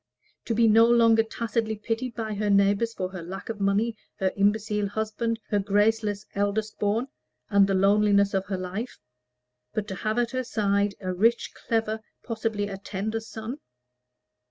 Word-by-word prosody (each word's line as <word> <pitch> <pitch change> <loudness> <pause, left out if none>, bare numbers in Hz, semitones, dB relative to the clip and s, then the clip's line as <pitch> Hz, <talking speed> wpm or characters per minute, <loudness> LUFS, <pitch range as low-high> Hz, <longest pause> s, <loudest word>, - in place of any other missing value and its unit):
to 230 - -1
be 230 0 +4
no 225 +1 +7
longer 230 -1 +5
tacitly 225 0 -2
pitied 225 +3 -3
by 220 -2 -3
her 210 0 -1
neighbors 200 +3 +3
for 185 -4 -3
her 185 -2 -7
lack 185 +6 -7
of 220 -2 -5
money, 205 +4 +1 0.2
her 190 -1 0
imbecile 210 0 +1
husband, 220 +2 -2
her 205 - +2
graceless 205 +1 +1
eldest 205 +2 -1
born, 215 +5 0 0.4
and 200 -1 +5
the 195 - +1
loneliness 200 +1 +4
of 195 0 -1
her 195 - -2
life; 190 +7 -5 0.8
but 210 -1 -1
to 195 - -4
have 215 +4 -2
at 240 -1 +1
her 255 0 -1
side 200 -3 0
a 185 -1 -2
rich, 230 +6 +2
clever, 220 -1 -1 0.2
possibly 220 -3 -2
a 195 -1 -6
tender, 205 +3 -3
son? 225 +4 -7
210 Hz, 165 wpm, -26 LUFS, 200-225 Hz, 0.8 s, no